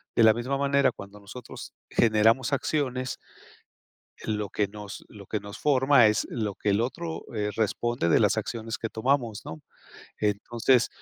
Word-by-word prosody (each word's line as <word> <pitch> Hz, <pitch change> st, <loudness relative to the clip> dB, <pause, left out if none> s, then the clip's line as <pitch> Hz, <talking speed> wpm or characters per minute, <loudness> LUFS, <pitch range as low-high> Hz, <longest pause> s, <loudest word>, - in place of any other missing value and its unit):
de 115 Hz, -, +5 dB
la 110 Hz, -1 st, +7 dB
misma 125 Hz, +4 st, -2 dB
manera, 140 Hz, -1 st, +3 dB
cuando 100 Hz, -2 st, -11 dB
nosotros 105 Hz, +4 st, -10 dB, 0.2 s
generamos 115 Hz, +3 st, +3 dB
acciones 130 Hz, -3 st, -1 dB, 1.1 s
lo 105 Hz, -2 st, -2 dB
que 105 Hz, -, 0 dB
nos 105 Hz, 0 st, -9 dB
lo 100 Hz, -3 st, -13 dB
que 105 Hz, -, -2 dB
nos 100 Hz, +1 st, -10 dB
forma 135 Hz, -4 st, +5 dB
es 105 Hz, -3 st, +1 dB
lo 105 Hz, -5 st, -2 dB
que 105 Hz, -, -2 dB
el 100 Hz, +2 st, +2 dB
otro, 160 Hz, +7 st, -4 dB
eh, 105 Hz, 0 st, -1 dB
responde 115 Hz, -2 st, 0 dB
de -, -, +5 dB
las -, -, +3 dB
acciones 115 Hz, 0 st, -3 dB
que 115 Hz, -, -3 dB
tomamos, 120 Hz, -2 st, -1 dB
¿no? 80 Hz, -1 st, -8 dB, 0.6 s
Entonces 115 Hz, +4 st, +2 dB
115 Hz, 160 wpm, -27 LUFS, 105-130 Hz, 1.1 s, la